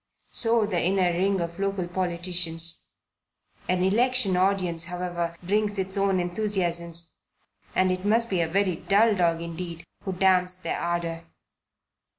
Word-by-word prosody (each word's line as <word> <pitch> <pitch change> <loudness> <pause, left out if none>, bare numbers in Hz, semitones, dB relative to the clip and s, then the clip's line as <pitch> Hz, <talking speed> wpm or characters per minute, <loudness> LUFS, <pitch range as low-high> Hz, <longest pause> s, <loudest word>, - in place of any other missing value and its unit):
So 230 -2 +2
the 185 -5 0
inner 180 0 +2
ring 190 +2 +1
of 170 +2 -5
local 195 -2 -1
politicians. 175 -2 -1 0.8
An 180 0 +2
election 225 0 +2
audience, 180 -3 +1
however, 175 -1 -3
brings 205 +2 0
its 190 0 -2
own 195 -1 +2
enthusiasms, 175 -3 -1 0.6
and 185 0 +3
it 185 0 -2
must 225 +3 +2
be 185 -5 0
a 165 - +1
very 185 0 +1
dull 210 +5 +3
dog 170 -2 +1
indeed 170 0 -6 0.2
who 190 - -2
damps 185 -1 +3
their 185 - -3
ardour. 170 -1 -2
180 Hz, 140 wpm, -26 LUFS, 170-195 Hz, 0.8 s, and